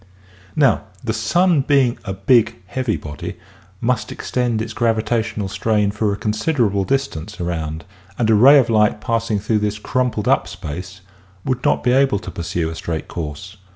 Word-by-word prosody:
Now 135 -7 +3 0.2
the 110 - -1
sun 160 +9 +2
being 135 -3 +2
a 95 - -4
big 110 +4 +3
heavy 120 +3 -2
body 75 -1 -7 0.4
must 115 -1 -1
extend 120 -3 -1
its 110 - -4
gravitational 110 -2 0
strain 105 0 +1
for 105 0 0
a 100 - -2
considerable 110 -2 0
distance 110 -8 -2
around 80 -2 -3 0.3
and 115 - +1
a 110 - +4
ray 130 +7 +8
of 130 -4 +4
light 105 -1 +3
passing 115 -1 -1
through 105 +2 0
this 105 0 -1
crumpled 125 -1 -1
up - - +3
space 90 +5 -7 0.4
would 130 -2 -1
not - - +2
be 125 - +3
able 135 -3 +3
to 95 -2 -7
pursue 85 -1 -2
a - - -6
straight 80 -1 -4
course. 85 +5 -6
110 Hz, 165 wpm, -20 LUFS, 95-125 Hz, 0.4 s, ray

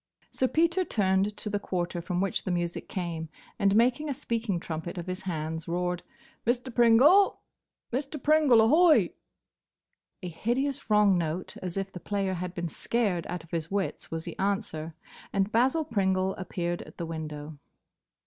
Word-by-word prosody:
Sir 260 - +1
Peter 335 +6 +2
turned 200 - +1
to - - -3
the 205 -1 -1
quarter 175 -3 -2
from 180 0 -2
which 195 - -1
the - - -4
music 175 -1 -2
came, 165 -3 -4 0.3
and, 200 0 +3
making 250 +6 +3
a 280 - -1
speaking 230 -7 -2
trumpet 165 +2 -5
of 175 - -4
his 185 0 -4
hands, 160 -3 -4
roared, 180 +1 -1 0.4
"Mr. 245 +2 -1
Pringle! 255 - +6 0.5
Mr. 280 +4 -2
Pringle, 300 -6 +5
ahoy!" 310 +8 +5 1.1
A - - -3
hideous 250 - -2
wrong 210 -3 +5
note, 165 +2 -3
as 180 0 -4
if 195 0 -2
the 180 - -8
player 195 0 -1
had 180 0 -4
been 175 -1 -2
scared 190 0 -1
out 180 -2 -4
of 165 - -19
his 165 -1 -2
wits, 195 -1 -2
was 165 0 -4
the - - -6
answer, 190 -6 -2 0.4
and 195 +1 0
Basil 265 +8 +2
Pringle 190 -5 +1
appeared 175 -2 -3
at - - -13
the 170 - -3
window. 155 -2 -6
190 Hz, 165 wpm, -28 LUFS, 175-235 Hz, 1.1 s, Pringle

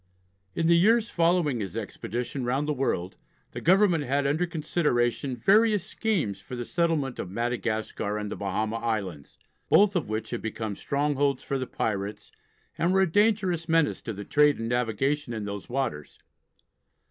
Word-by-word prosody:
In 165 - 0
the 170 +1 +5
years 225 +6 +4
following 165 -6 +2
his 95 -4 -5
expedition 125 +4 -4
round 135 +4 0
the 150 - +1
world 95 -9 -2 0.3
the - - -6
Government 180 -3 +4
had 140 +1 0
under 155 +6 +1
consideration 140 -6 0
various 210 - +4
schemes 155 - -1
for 125 - -8
the 120 -1 -4
settlements 165 -6 0
of 90 - -4
Madagascar 110 -1 -2
and 105 -1 -4
the - - -3
Bahama 110 +3 -2
Islands, 100 -11 -4 0.3
both 200 -1 +5
of 170 - -1
which 110 0 -3
had 120 - -3
become 110 -2 -4
strongholds 140 +1 0
for 135 - -2
the 130 - -3
pirates 100 -1 -3 0.5
and 170 +2 +2
were 190 0 +4
a 190 -4 +2
dangerous 190 -5 +2
menace 165 -2 +2
to 115 - -5
the 100 0 -7
trade 150 +4 +4
and 115 0 -4
navigation 125 +3 0
in 110 -2 -4
those 100 -1 -6
waters. 120 - -3
135 Hz, 165 wpm, -27 LUFS, 110-165 Hz, 0.5 s, the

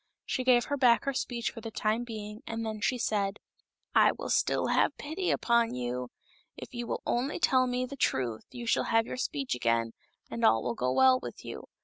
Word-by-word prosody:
She 255 - -1
gave 250 -1 +4
her 285 - -2
back 245 -3 +4
her 275 - 0
speech 240 -2 -2
for 230 - -9
the 225 - -5
time 220 +2 0
being, 215 -2 -7
and 225 0 -3
then 215 -1 -4
she 250 - +1
said. 205 -3 0 0.3
" - - -54
I - - +6
will - - -5
still - - +1
have - - +2
pity 325 +6 -3
upon 235 - +2
you. 125 0 -3 0.5
If - - -9
you 240 -1 -4
will - - -3
only 255 +5 0
tell 260 -6 +3
me 250 0 -1
the 280 - -8
truth 125 - -1
you 240 -1 -8
shall 225 - +2
have 225 0 +2
your 255 - -6
speech 140 - -2
again, 115 -1 +1 0.4
and 230 - -5
all 115 - +4
will 120 - -1
go 125 +2 -1
well 260 - +5
with - - -8
you. - - -7
230 Hz, 220 wpm, -29 LUFS, 195-255 Hz, 0.5 s, I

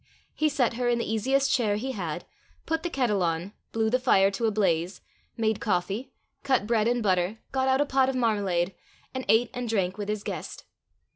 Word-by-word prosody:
He 310 0 +1
set 270 -5 +1
her 245 +1 0
in 240 - +2
the 235 - -1
easiest 265 +6 +1
chair 220 -7 +2
he 255 +6 -3
had, 175 -7 -4 0.4
put 325 0 -1
the 345 - -2
kettle 245 - +1
on, 170 +3 -1 0.2
blew 225 -1 +1
the 255 - +3
fire 195 -6 +4
to 225 +3 0
a - - +1
blaze, 180 -3 0 0.4
made 220 -2 +1
coffee, 205 +6 -1 0.3
cut 260 -6 +1
bread 220 -1 +2
and 240 -1 +1
butter, 185 +1 +1
got 265 -1 +1
out 265 +1 +3
a - - +3
pot 265 -1 +2
of 265 - -2
marmalade, 200 -7 +1 0.4
and 260 -1 -4
ate 230 +2 +4
and 245 -1 -4
drank 190 -3 0
with 205 0 -4
his 210 -1 -2
guest. - - -6
225 Hz, 205 wpm, -27 LUFS, 195-255 Hz, 0.4 s, fire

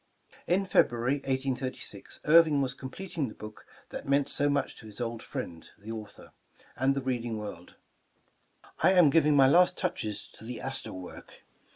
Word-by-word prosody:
In 190 +3 +2
February, 125 -6 +2
1836, 130 -1 -4
Irving 155 -2 +6
was 135 -2 0
completing 150 +2 -5
the 110 - -10
book 105 0 -11 0.2
that - - -7
meant 140 0 +3
so 145 0 +1
much 145 - 0
to 110 - -11
his 105 +1 -10
old 115 -1 -3
friend, 90 - -7
the 105 +2 -9
author, 110 -2 -9 0.4
and 135 +1 +2
the 135 - -2
reading 120 -3 -2
world. 100 -5 -8 1.1
"I 190 - +6
am 175 -6 +6
giving 150 -1 +4
my 135 -1 +7
last 175 +6 +5
touches 110 - -2
to - - -15
the 120 +2 -6
Astor 135 0 -4
work. 90 -1 -11
130 Hz, 165 wpm, -29 LUFS, 115-145 Hz, 1.1 s, my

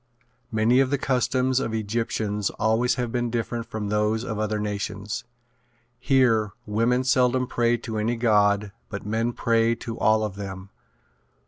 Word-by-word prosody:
Many 115 +3 +3
of 135 -1 +3
the 140 - +1
customs 130 0 +1
of 115 -4 -2
Egyptians 105 -2 -1
always 110 +3 +2
have 125 -3 -2
been 120 -1 -1
different 115 0 -3
from 105 -2 -4
those 105 +2 +1
of 115 -4 -4
other 110 0 -1
nations. 105 +2 -4 0.7
Here 120 -6 +2
women 115 +4 +1
seldom 130 -1 +2
pray 120 -1 +1
to 110 -2 -5
any 115 +3 0
god 105 -3 +2 0.2
but 100 -1 -6
men 115 +3 0
pray 115 0 +2
to 115 0 -7
all 110 0 +3
of 100 -2 -4
them. 95 -1 -7
115 Hz, 150 wpm, -25 LUFS, 105-120 Hz, 0.7 s, Many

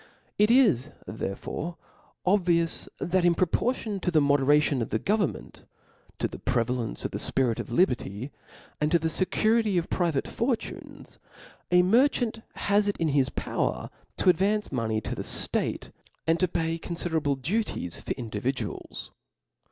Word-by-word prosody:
It 210 +1 +5
is 210 - +4 0.2
therefore 110 - -5 0.5
obvious, 175 -3 +2
that 180 +1 +1
in 175 -1 +4
proportion 210 +4 0
to 180 - -1
the 160 -3 +4
moderation 145 -1 +3
of 115 - -2
the 110 - +1
government, 200 - -1 0.5
to - - 0
the - - -9
prevalence 120 -1 -1
of - - -2
the - - -3
fpirit 125 -4 0
of - - -5
liberty; 125 - 0 0.5
arid 150 +3 +1
to - - +7
the 165 0 -1
fecurity 215 +2 +2
of* 170 - -1
private 165 -6 0
fortunes, 235 0 -4 0.5
a 180 0 +5
merchant 235 +2 +2
has 205 +1 +2
it 205 - 0
in 165 - +1
his 140 -2 +2
power - - -2 0.3
to - - +3
advance 205 +5 0
money 110 -4 -1
to - - -4
the - - -4
ftate, - - -2 0.3
and 165 +1 +2
to 185 - +3
pay 165 0 -1
confi 170 +1 -4
derable 145 -4 0
duties 165 - -2
for - - -2
individuals. 120 +3 -4
165 Hz, 150 wpm, -27 LUFS, 135-200 Hz, 0.5 s, to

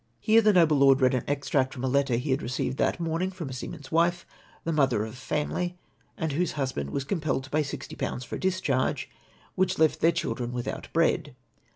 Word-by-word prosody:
" - - -43
Here 225 +1 +7
the 215 -1 +5
noble 165 -6 +4
lord 135 -1 +6
read 130 -1 +4
an 125 - -1
extract 140 -2 0
from 130 - -6
a - - +1
letter 135 -1 +2
he 130 +4 -1
had 130 - +1
received 125 +1 -2
that - - +1
morning 165 +2 -1
from 180 -6 -6
a - - -6
seaman's 135 +3 -7
wife, 170 +2 +2 0.4
the 165 - -1
mother 130 -8 +2
of 110 - -8
a - - -11
family, 175 +7 -2 0.4
and 160 -2 -1
whose 170 +4 0
huslDand 130 - -2
was 140 - -2
compelled 150 -3 -1
to 130 - -12
pay 155 - +2
60/. 140 -3 -4
for - - -5
a - - -10
discharge, 185 -9 0 0.4
which 185 0 +1
left 160 -1 +3
their 165 - +4
children 125 -6 -3
Avithout 120 0 -5
bread. 160 -3 +1
145 Hz, 215 wpm, -27 LUFS, 130-165 Hz, 0.4 s, Here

